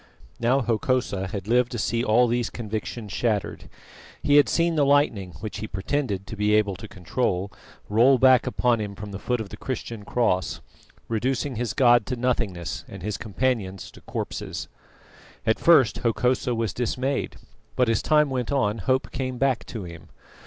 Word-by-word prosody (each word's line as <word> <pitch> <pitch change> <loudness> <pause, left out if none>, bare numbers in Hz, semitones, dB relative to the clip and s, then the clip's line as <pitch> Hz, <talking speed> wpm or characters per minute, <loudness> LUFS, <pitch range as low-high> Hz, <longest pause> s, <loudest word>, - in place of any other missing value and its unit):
Now 125 +4 +2
Hokosa 115 -4 0
had 100 -1 -6
lived 125 +1 +3
to - - -2
see 115 +2 0
all 120 +2 +4
these 120 0 0
convictions 105 -2 -5
shattered: 110 -5 -2 0.5
he 145 0 +5
had 145 - +6
seen 170 0 +2
the 150 -3 +2
lightning, 140 - +2
which 110 -1 -5
he 110 - -4
pretended 100 -1 -2
to 110 - -7
be 105 0 +2
able 100 -2 +2
to - - -9
control, 95 +1 -2 0.4
roll 120 +6 +5
back 130 0 +5
upon 120 -2 +1
him 100 -1 -5
from 105 +1 -8
the 100 - -6
foot 125 +3 -1
of 110 -3 -5
the - - -9
Christian 115 -4 -5
cross, 100 -5 0 0.5
reducing 130 +4 -1
his 120 0 -2
god 120 -4 +5
to 125 - -2
nothingness 100 -8 -2
and 95 -2 -10
his 105 0 -2
companions 105 -4 -2
to - - -16
corpses. - - -5 0.8
At 110 - +2
first 135 -10 +5
Hokosa 125 +1 +1
was 115 -4 -1
dismayed, 130 +3 -2 0.4
but 125 - +3
as 115 -1 +2
time 150 -2 +3
went 125 -2 -2
on 115 -6 +1
hope 130 +8 0
came 130 -1 -3
back 135 -2 +1
to 110 -5 -6
him. 85 -2 -10
115 Hz, 175 wpm, -25 LUFS, 105-130 Hz, 0.8 s, had